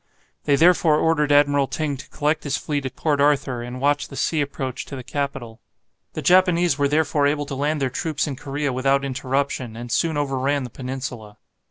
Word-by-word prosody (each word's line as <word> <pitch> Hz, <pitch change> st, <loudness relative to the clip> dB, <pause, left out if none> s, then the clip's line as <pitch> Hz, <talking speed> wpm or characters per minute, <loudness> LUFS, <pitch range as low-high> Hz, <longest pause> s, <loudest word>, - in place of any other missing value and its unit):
They 145 Hz, -, +4 dB
therefore 165 Hz, -1 st, +4 dB
ordered 150 Hz, -2 st, +2 dB
Admiral 145 Hz, -1 st, +4 dB
Ting 150 Hz, -1 st, -2 dB
to -, -, -12 dB
collect 150 Hz, +1 st, -1 dB
his 145 Hz, -, -1 dB
fleet 145 Hz, -3 st, -2 dB
at 130 Hz, -, -10 dB
Port 145 Hz, -3 st, 0 dB
Arthur, 140 Hz, -4 st, +2 dB
and 125 Hz, +1 st, -6 dB
watch 145 Hz, +2 st, +1 dB
the 140 Hz, -, -11 dB
sea 155 Hz, +2 st, 0 dB
approach 140 Hz, -3 st, -4 dB
to 140 Hz, -, -8 dB
the 130 Hz, -, -7 dB
capital. 135 Hz, -4 st, -4 dB, 0.5 s
The -, -, -5 dB
Japanese 180 Hz, -3 st, +4 dB
were 145 Hz, 0 st, +1 dB
therefore 150 Hz, -1 st, +2 dB
able 145 Hz, 0 st, 0 dB
to 140 Hz, -, -6 dB
land 145 Hz, +3 st, -1 dB
their 130 Hz, -, 0 dB
troops 155 Hz, +2 st, -2 dB
in 145 Hz, -3 st, -4 dB
Korea 140 Hz, 0 st, -3 dB
without 135 Hz, +2 st, +1 dB
interruption, 135 Hz, -3 st, -2 dB
and 120 Hz, +1 st, -7 dB
soon 160 Hz, +2 st, +1 dB
overran 140 Hz, 0 st, 0 dB
the 125 Hz, -, -7 dB
peninsula. 125 Hz, -5 st, -6 dB
140 Hz, 195 wpm, -22 LUFS, 130-150 Hz, 0.5 s, They